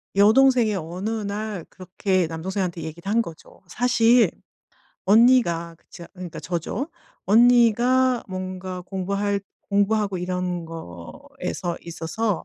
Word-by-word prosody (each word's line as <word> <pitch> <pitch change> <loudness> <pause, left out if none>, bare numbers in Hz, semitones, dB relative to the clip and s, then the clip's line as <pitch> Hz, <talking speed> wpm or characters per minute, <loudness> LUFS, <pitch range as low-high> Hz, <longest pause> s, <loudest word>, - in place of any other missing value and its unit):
여동생이 230 +1 +5
어느 180 +4 -4
날 210 -3 -4
그렇게 185 -1 -1
남동생한테 175 +1 -3
얘기를 170 +5 -7
한 230 +2 +3
거죠. 165 -6 -13
"사실 240 +2 +3 0.8
언니가..." 205 -7 +4
그 - - -35
제가 170 - -11
음 - - -30
그러니까 180 -3 -7
저죠. 175 - -3 0.4
"언니가 240 +3 +4
뭔가 185 0 -5
공부할 200 +2 -2 0.3
공부하고 200 -1 +1
이런 180 -1 -3
거에서 160 - -6
있어서 170 +4 -3
195 Hz, 270 characters per minute, -23 LUFS, 175-220 Hz, 0.8 s, 여동생이